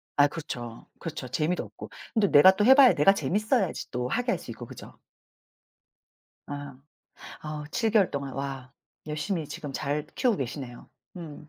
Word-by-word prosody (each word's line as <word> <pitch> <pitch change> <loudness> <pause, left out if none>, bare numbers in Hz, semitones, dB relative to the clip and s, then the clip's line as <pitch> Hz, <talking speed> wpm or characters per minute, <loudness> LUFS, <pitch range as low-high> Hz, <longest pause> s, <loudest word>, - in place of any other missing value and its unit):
아 145 0 +6
그렇죠. 120 -7 -7
그렇죠. 150 -5 -6
재미도 155 +7 0
없고. - - -11 0.2
근데 220 -3 +3
내가 185 +7 +8
또 210 - +1
해 265 - +9
봐야 270 -3 +8
내가 195 - +5
재밌어야지 210 0 0
또 125 0 -2
하게 245 - 0
할 - - 0
수 - - -9
있고 - - -8
그죠. - - -11 1.5
아. 145 -2 -7 0.7
아 150 -1 -5
7 225 +5 0
개월 205 -4 +4
동안 140 -1 -4
와. 135 -2 -5 0.3
열심히 155 +2 -3
지금 145 -2 -7
잘 145 +2 -2
키우고 240 -5 +2
계시네요. 130 -2 -6 0.3
음. 155 -3 -9
150 Hz, 300 characters per minute, -27 LUFS, 140-195 Hz, 1.5 s, 해